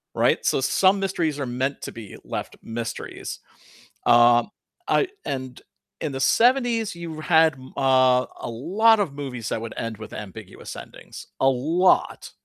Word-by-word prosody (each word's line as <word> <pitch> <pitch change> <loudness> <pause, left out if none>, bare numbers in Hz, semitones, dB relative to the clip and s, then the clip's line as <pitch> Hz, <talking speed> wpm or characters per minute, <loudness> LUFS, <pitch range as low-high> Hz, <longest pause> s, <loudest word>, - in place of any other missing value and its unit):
Right? - - +2
So - - +2
some 190 +8 +3
mysteries 170 -6 -1
are 140 - -3
meant 130 +3 -3
to - - -6
be 110 -4 -10
left - - -5
mysteries. 115 0 -6 0.7
Um, 120 - +5 0.4
I 405 - +2 0.2
and 130 -2 -5 0.4
in 145 - -3
the 135 - -5
'70s 235 - +2
you 165 -2 -7
had 160 -1 +4
m 130 0 -14
uh, 130 -2 +4
a - - -5
lot 200 - +3
of 195 -9 -1
movies 125 -6 -5
that 110 - -2
would 115 -1 -7
end 115 -1 -4
with 110 - -10
ambiguous 105 -1 -9
endings. - - -11
A 135 - +4
lot. 160 +8 +1
135 Hz, 155 wpm, -24 LUFS, 120-175 Hz, 0.7 s, Um